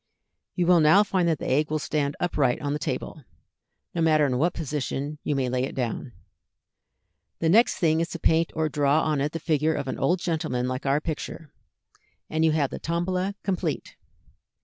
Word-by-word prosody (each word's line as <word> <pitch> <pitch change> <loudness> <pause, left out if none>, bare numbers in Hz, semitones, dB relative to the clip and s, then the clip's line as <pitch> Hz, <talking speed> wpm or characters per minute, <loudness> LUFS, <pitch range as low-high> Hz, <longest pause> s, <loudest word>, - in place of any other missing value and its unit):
You 180 - +1
will 175 0 +5
now 160 +7 +6
find 185 -4 0
that 165 -2 +2
the - - -5
egg 150 +4 +1
will 155 - 0
stand 145 -1 -1
upright 145 -8 +1
on 145 -1 -2
the 150 - -2
table, 150 - -4 0.7
no 170 - -1
matter 155 -2 +4
in 125 -3 0
what 170 +4 +1
position 145 -1 -3
you 145 - -1
may 135 -2 0
lay 125 0 0
it 135 - -4
down. 125 0 -3 1.2
The 165 - 0
next 225 +7 +5
thing 160 -2 +2
is 170 - -2
to - - -5
paint 165 +1 +2
or 160 -1 +1
draw 145 +1 +2
on 150 -3 0
it 145 +2 0
the 165 - -4
figure 155 -1 +1
of 135 - -3
an - - -4
old 175 +7 +2
gentleman 155 -8 -1
like 130 +2 -3
our 140 +2 +2
picture, 155 -1 -6 0.8
and 160 0 +1
you 160 - +4
have 150 -3 0
the - - -5
Tombola 180 +4 -1
complete. 180 -5 -2
155 Hz, 195 wpm, -25 LUFS, 140-165 Hz, 1.2 s, now